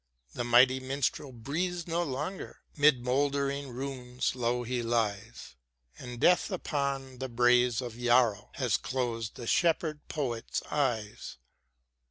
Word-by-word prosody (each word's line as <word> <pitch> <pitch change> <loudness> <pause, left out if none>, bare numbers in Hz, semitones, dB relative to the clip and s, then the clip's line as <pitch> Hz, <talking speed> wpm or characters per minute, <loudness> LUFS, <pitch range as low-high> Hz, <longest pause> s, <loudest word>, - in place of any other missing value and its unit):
The - - -3
mighty 125 +2 +5
Minstrel 135 +1 -2
breathes 165 +9 -3
no 170 0 -1
longer, 155 +5 -4
'Mid 145 -5 +4
mouldering 140 +1 0
ruins 125 -1 -3
low 120 -1 -1
he 125 +1 -2
lies; 115 - -2 0.5
And 125 -2 -8
death 180 +7 +4
upon 140 -7 -3
the 130 0 -4
braes 120 0 +3
of 120 -2 -6
Yarrow 120 -4 +3
Has 125 -6 +1
closed 115 -4 -3
the 120 - -7
Shepherd 160 +1 +1
poet's 125 -7 -3
eyes. 120 -8 -2
130 Hz, 125 wpm, -30 LUFS, 120-140 Hz, 0.5 s, mighty